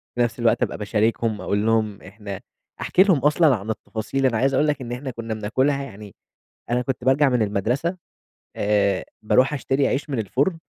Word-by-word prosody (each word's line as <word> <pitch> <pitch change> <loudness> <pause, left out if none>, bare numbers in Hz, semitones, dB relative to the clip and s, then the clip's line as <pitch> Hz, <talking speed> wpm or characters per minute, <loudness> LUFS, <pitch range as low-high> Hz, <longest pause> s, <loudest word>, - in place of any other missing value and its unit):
في 120 - 0
نفس 120 0 0
الوقت 115 -1 +2
أبقى - - -2
باشاركهم 110 +1 0
أقول 105 +2 -1
لهم 110 -3 +1
إحنا 100 0 -8 0.4
أحكي 185 - +4
لهم 185 -7 +3
أصلًا 150 -1 +4
عن 105 +2 -7
التفاصيل، 110 +5 -3
أنا 115 -4 +2
عايز 135 +3 +2
أقول 150 +3 +3
لك 145 -2 -1
إن 120 -1 -6
إحنا 130 +2 -4
كنا 115 -1 -5
بناكلها 130 +7 0
يعني 105 -6 -11 0.5
أنا 125 +1 +1
كنت 130 0 -3
بارجع 135 +2 +4
من 125 -3 +1
المدرسة 120 - -1 0.6
آآ، 100 -2 +1 0.2
باروح 130 +6 +3
أشتري 135 -1 0
عيش 145 +3 -2
من 130 -5 -1
الفُرن، 140 - 0
120 Hz, 185 wpm, -23 LUFS, 105-135 Hz, 0.6 s, أحكي